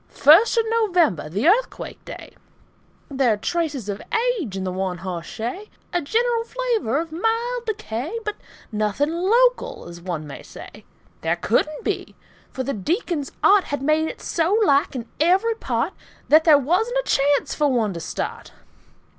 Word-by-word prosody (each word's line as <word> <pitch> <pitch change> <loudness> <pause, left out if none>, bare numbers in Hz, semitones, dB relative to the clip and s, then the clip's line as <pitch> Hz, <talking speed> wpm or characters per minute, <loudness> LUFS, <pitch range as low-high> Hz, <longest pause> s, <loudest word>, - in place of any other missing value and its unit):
FIRST 335 - +5
OF 455 - +3
NOVEMBER, 355 - +1
The 205 - 0
Earthquake 465 +7 0
day - - -10 0.8
There 265 -4 +2
are - - -3
traces 295 - -2
of 200 0 -4 0.4
age 205 - -5
in 190 - -3
the 185 - -2
one 185 -1 -2
hoss 175 -2 -5
shay, 245 - -5 0.2
A 350 - +1
general 465 +8 +1
flavor 465 - -1
of 325 0 -5
mild 460 +7 -1
decay, 390 - -3
But 425 0 -3 0.3
nothing 215 +8 0
local, 485 - +1
as 170 0 -10
one 170 -4 -4
may 145 - -9
say. - - -12 0.4
There 165 +1 +1
couldn't 245 - 0
be, - - -3 0.3
for 260 - -4
the 275 +2 -2
Deacon's 310 - -2
art 400 -2 +5
Had 285 -1 -4
made 310 +2 +2
it - - -9
so 340 +5 +1
like 285 -1 +2
in 240 -2 -5
every 375 +8 +3
part 445 - -2 0.4
That 315 +1 +6
there 310 -3 +8
wasn't 365 - 0
a - - +1
chance 280 +1 +2
for 295 -2 +1
one 225 -5 +1
to 170 - -6
start. - - -5
310 Hz, 165 wpm, -22 LUFS, -, 0.8 s, there